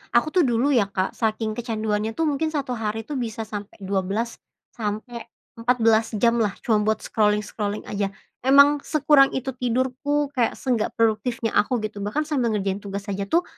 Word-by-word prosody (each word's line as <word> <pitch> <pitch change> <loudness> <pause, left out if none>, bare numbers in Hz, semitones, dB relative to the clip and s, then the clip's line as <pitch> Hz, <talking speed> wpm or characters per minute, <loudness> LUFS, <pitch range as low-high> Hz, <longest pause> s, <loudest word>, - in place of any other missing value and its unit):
Aku 270 +6 +3
tuh 350 -5 +3
dulu 245 +4 +2
ya, 230 -7 +3
Kak, 190 -1 -1
saking 220 -1 -1
kecanduannya 220 -1 -2
tuh 325 - 0
mungkin 290 +3 0
1 290 -4 -3
hari 220 0 -2
tuh 280 +3 -4
bisa 225 -2 -3
sampe 205 -1 -7
12 195 +4 -2 0.3
sampe 225 +2 -5 0.3
14 230 -2 +3
jamlah 230 -2 +2
cuma 220 -3 +3
buat 220 - 0
scrolling-scrolling 210 -1 0
aja. 200 -1 0 0.4
Emang 280 +2 +7
sekurang 290 -2 +4
itu 265 0 -2
tidurku, 260 +4 -1
kayak 250 -5 0
seenggak 245 -5 -1
produktifnya 225 0 0
aku 210 +5 +2
gitu, 210 -1 -5
bahkan 210 +10 -1
sambil 255 -8 0
ngerjain 195 -1 -1
tugas 200 0 -6
aja 195 0 -3
tuh, 340 - +2
225 Hz, 165 wpm, -24 LUFS, 210-260 Hz, 0.4 s, Emang